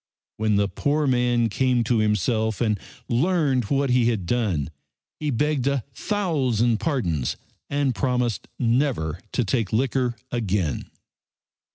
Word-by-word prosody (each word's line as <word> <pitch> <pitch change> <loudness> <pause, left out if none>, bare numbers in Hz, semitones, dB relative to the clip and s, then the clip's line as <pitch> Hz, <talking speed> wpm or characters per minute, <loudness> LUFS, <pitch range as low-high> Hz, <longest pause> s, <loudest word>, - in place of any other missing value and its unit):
When 110 -1 +1
the 100 0 +3
poor 145 +10 0
man 120 -3 +2
came 125 +2 +1
to 115 0 +1
himself 110 +1 +1
and 110 -4 +1 0.3
learned 140 - +2
what 140 +3 +1
he 125 -1 +4
had 105 -6 -1
done 90 - 0 0.5
he 150 - -1
begged 140 +1 0
a 140 -4 +1
thousand 130 - +1
pardons 90 - -1 0.3
and 140 -2 +1
promised 125 -2 -1
never 115 - +1
to 125 - +1
take 110 -1 0
liquor 125 +1 +1 0.2
again. 100 - -1
120 Hz, 130 wpm, -24 LUFS, 110-135 Hz, 0.5 s, he